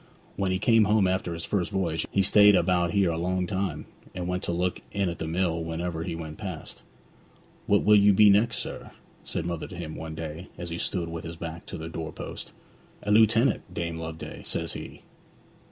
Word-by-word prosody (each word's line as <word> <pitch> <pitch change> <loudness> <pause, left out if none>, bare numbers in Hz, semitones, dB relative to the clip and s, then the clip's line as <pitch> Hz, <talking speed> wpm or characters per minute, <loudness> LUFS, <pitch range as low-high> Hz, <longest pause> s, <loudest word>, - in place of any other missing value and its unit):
When 95 -1 0
he 95 - +1
came 110 +2 +4
home 105 -1 +3
after 95 -1 -1
his 85 - -5
first 95 -4 0
voyage 85 -6 -1
he 100 - +2
stayed 105 +1 +7
about 90 -1 +2
here 100 -3 +2
a 80 - -2
long 90 +1 0
time, 95 +1 -2 0.3
and 90 -1 -3
used 90 0 -1
to - - -1
look 90 +1 -1
in 100 -3 0
at 85 - -6
the 80 - -3
mill 85 0 0
whenever 80 0 -3
he 85 0 -3
went 80 +1 -7
past. 95 -7 -7 0.9
"What 100 - +4
will 105 - +6
you 100 0 +6
be 105 +1 +7
next, 105 +2 +3
sir?" - - -6 0.3
said 85 - -3
mother 85 -2 -3
to 90 - -9
him 80 -3 -6
one 80 -1 -6
day 80 +2 -6
as 85 -1 -6
he 85 - -3
stood 90 -4 0
with 85 0 -6
his 85 0 -6
back 85 0 -7
to - - -6
the 80 - -6
doorpost. 80 -1 -6 0.5
"A 105 - -1
lieutenant, 110 -1 +4
Dame 85 -2 -3
Loveday," 80 0 -7
says - - 0
he. - - -9
90 Hz, 205 wpm, -27 LUFS, 80-100 Hz, 0.9 s, stayed